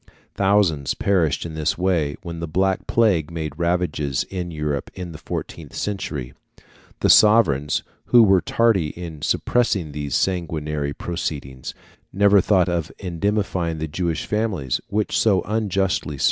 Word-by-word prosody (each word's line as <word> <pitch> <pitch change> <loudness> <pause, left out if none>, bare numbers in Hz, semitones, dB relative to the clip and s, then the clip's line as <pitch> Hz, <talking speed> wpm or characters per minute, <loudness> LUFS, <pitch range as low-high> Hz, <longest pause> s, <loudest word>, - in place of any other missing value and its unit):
Thousands 95 -8 +2
perished 85 -8 +1
in 85 - -6
this 80 -1 -1
way 85 -5 0
when 85 -2 -6
the 85 - -4
black 95 +4 0
plague 100 -10 +2
made 80 -3 -4
ravages 85 -6 0
in 90 -2 -4
Europe 75 -3 -3
in 90 -2 -6
the 75 - -10
fourteenth - - -6
century. 75 -11 -4 0.7
The - - +2
sovereigns, 80 -11 +4 0.2
who 120 -2 +6
were 95 -3 +5
tardy 115 -8 +2
in 80 -4 -7
suppressing 100 -9 0
these 70 -2 -3
sanguinary 75 -5 -1
proceedings, 70 -7 -5 0.4
never 100 +1 +5
thought 95 -2 +3
of 85 -3 -2
indemnifying 90 -2 -1
the 80 +1 -3
Jewish 85 +1 -2
families 105 - -1
which 105 +1 -1
so 100 -5 +3
unjustly 95 -8 -1
suffered. - - -13
85 Hz, 140 wpm, -22 LUFS, 75-95 Hz, 0.7 s, who